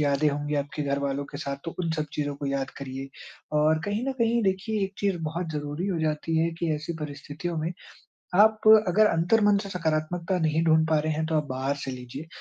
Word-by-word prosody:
यादें 145 +1 +3
होंगी 145 +1 -2
आपके 145 +1 -2
घरवालों 140 0 -1
के 140 - -5
साथ 140 0 -3
तो 165 - -5
उन 170 -2 -1
सब 155 - 0
चीज़ों 145 -1 -1
को 140 - -4
याद 140 -1 -1
करिए। 135 0 -6 0.5
और 155 +1 +4
कहीं 205 +4 -1
न - - 0
कहीं 235 0 +2
देखिए 200 +2 0
एक 190 - -6
चीज़ 195 -3 0
बहुत 165 +2 -3
ज़रूरी 150 +4 -3
हो 180 -4 -1
जाती 155 +1 -1
है 165 +1 +2
कि 170 -2 0
ऐसी 155 +3 -4
परिस्थितियों 150 +3 -5
में 165 +3 -2 0.7
आप 215 0 +5 0.3
अगर 210 +5 +5
अंतर्मन 205 +4 +3
से 200 - -7
सकारात्मकता 170 +1 -1
नहीं 160 -1 +1
ढूँढ 160 -1 +4
पा 155 -1 +3
रहे 155 +1 -1
हैं 160 +1 -1
तो 160 - -2
आप 150 - +1
बाहर 135 +2 -1
से 140 -1 -5
लीजिए। 125 +4 -7
155 Hz, 215 wpm, -27 LUFS, 145-180 Hz, 0.7 s, आप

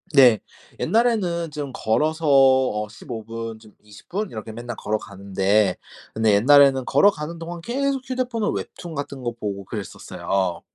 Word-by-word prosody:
네. 125 -6 +7 0.4
옛날에는 195 -8 +1
좀 145 -2 -5
걸어서 155 +9 0
어 130 -6 +4
15 110 +1 -8
분 115 0 -6
좀 110 -2 -18
20 105 0 -16
분 205 +3 -3
이렇게 110 0 -7
맨날 120 +1 -6
걸어가는데, 100 -1 0 0.4
근데 110 -1 +2
옛날에는 135 +3 +6
걸어가는 160 +1 +2
동안 170 +1 -6
계속 270 +5 -1
휴대폰을 250 -4 -1
웹툰 170 -3 -6
같은 140 -2 -5
거 120 -1 -2
보고 100 -4 -5
그랬었어요. 95 -3 -3
130 Hz, 295 characters per minute, -23 LUFS, 110-165 Hz, 0.4 s, 네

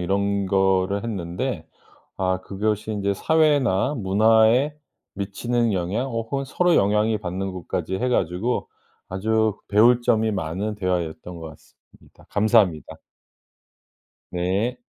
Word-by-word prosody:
이런 100 +2 0
거를 95 +1 +1
했는데 90 -6 -3 0.5
아 95 0 0
그것이 105 +3 -2
인제 100 -1 -1
사회나 145 -4 +2
문화에 110 +6 +3 0.4
미치는 115 +3 -1
영향, 95 +8 -1
어 115 -1 -2
혹은 135 +5 -4
서로 175 +5 +2
영향이 105 +2 +2
받는 95 0 -4
것까지 90 0 -4
해 125 +6 -1
가지고 100 +3 -1 0.4
아주 110 +2 0
배울 120 +4 +5
점이 110 -2 +2
많은 95 +3 -3
대화였던 90 -3 -3
것 80 -1 -7
같습니다. - - -21
감사합니다. 105 - +2 1.3
네. 95 +8 -1
100 Hz, 255 characters per minute, -23 LUFS, 95-115 Hz, 1.3 s, 배울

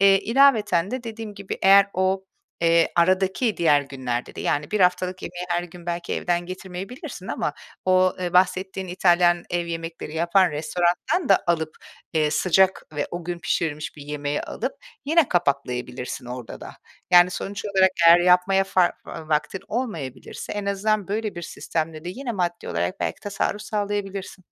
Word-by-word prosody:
Eee, 195 -1 +6
ilaveten 215 -8 +3
de 255 -1 -3
dediğim 225 -2 -7
gibi, 200 -1 -6
eğer 195 +1 +7
o, 190 +1 0 0.4
eee, 170 0 +3
aradaki 190 +6 +2
diğer 150 -4 +4
günlerde 130 -3 -4
de, 145 0 -1
yani, 210 -2 0
haftalık 180 0 +1
yemeği 175 +1 -5
her 175 0 0
gün 175 0 -12
belki 170 0 -3
evden 175 0 -1
getirmeyebilirsin 190 +5 -7
ama - - -2 0.3
o, 185 0 +3
eee, 175 -1 -2
bahsettiğin 185 +1 +1
İtalyan 175 -1 +3
ev 175 -1 -1
yemekleri 165 -2 -6
yapan 175 +3 +3
restorandan 175 - 0
da 195 - +6
alıp, 160 -2 0 0.4
eee, 155 -1 +2
sıcak 190 +3 +3
ve 145 0 -1
o 175 -1 -5
gün 175 0 -4
pişirilmiş 155 -3 -2
bir 145 - -9
yemeği 145 0 -3
alıp - - -4 0.3
yine 315 0 +3
kapaklayabilirsin 125 -7 -2
orada 125 -3 -7
da. - - -8 0.4
Yani, 180 0 +7
sonuç 200 +2 -5
olarak 190 -2 +3 0.2
eğer 170 +1 +9
yapmaya 180 +2 +4
fa 185 -2 +2
va 160 -2 -8
vaktin 155 +5 0
olmayabilirse 170 - -5
en 205 -1 -4
azından 200 0 0
böyle 215 +1 -2
bir 175 - -7
sistemle 160 -1 -4
de - - -4
yine 245 +6 -4
maddi 175 -4 -2
olarak 85 +2 -2
belki - - -2
tasarruf 205 0 -2
sağlayabilirsin. 200 -3 -4
180 Hz, 160 wpm, -24 LUFS, 165-195 Hz, 0.4 s, eğer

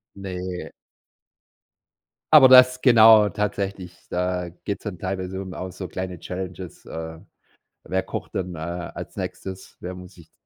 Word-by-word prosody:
Ne. 90 -3 -6 1.6
Aber 145 -4 +10
das 125 0 +7
genau 110 -4 +7
tatsächlich, 100 -3 -3
da 90 -1 -2
geht's 100 - -4
dann 95 -5 -6
teilweise 95 0 -4
um 95 -1 -7
auch 95 0 -6
so 95 0 -7
kleine 90 -2 -5
Challenges, 90 -1 -7
äh. 80 0 -7 0.7
Wer 95 0 0
kocht - - -7
denn, 90 -2 -3
äh, - - -9
als 85 +2 -6
Nächstes? 95 0 -7
Wer 90 +1 -6
muss 90 0 -11
sich 85 -3 -17
95 Hz, 140 wpm, -23 LUFS, 90-100 Hz, 1.6 s, Aber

